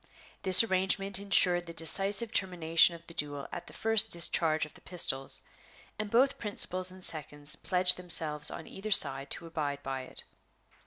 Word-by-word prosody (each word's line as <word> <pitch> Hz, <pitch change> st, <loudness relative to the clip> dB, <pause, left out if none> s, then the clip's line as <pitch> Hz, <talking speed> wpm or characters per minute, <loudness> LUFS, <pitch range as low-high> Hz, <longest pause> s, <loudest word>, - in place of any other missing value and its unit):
This 190 Hz, +2 st, +8 dB
arrangement 195 Hz, -1 st, +1 dB
insured 180 Hz, -3 st, +1 dB
the 170 Hz, -, -9 dB
decisive 200 Hz, +7 st, 0 dB
termination 170 Hz, -2 st, +2 dB
of 170 Hz, 0 st, -16 dB
the 165 Hz, -, -12 dB
duel 145 Hz, -2 st, -4 dB
at 175 Hz, -, -9 dB
the -, -, -12 dB
first 225 Hz, -1 st, +2 dB
discharge 160 Hz, -2 st, 0 dB
of 150 Hz, -, -17 dB
the -, -, -17 dB
pistols, 135 Hz, -7 st, -1 dB, 0.6 s
and 215 Hz, -1 st, -5 dB
both 260 Hz, +5 st, +1 dB
principals 185 Hz, -3 st, 0 dB
and 185 Hz, 0 st, -9 dB
seconds 145 Hz, -2 st, -3 dB
pledged 180 Hz, -1 st, +1 dB
themselves 160 Hz, -4 st, +1 dB
on 160 Hz, -, -10 dB
either 205 Hz, +3 st, -9 dB
side 135 Hz, -8 st, +2 dB
to -, -, -6 dB
abide 145 Hz, -4 st, -6 dB
by 135 Hz, -1 st, -6 dB
it. 130 Hz, -, -8 dB
175 Hz, 165 wpm, -28 LUFS, 155-195 Hz, 0.6 s, This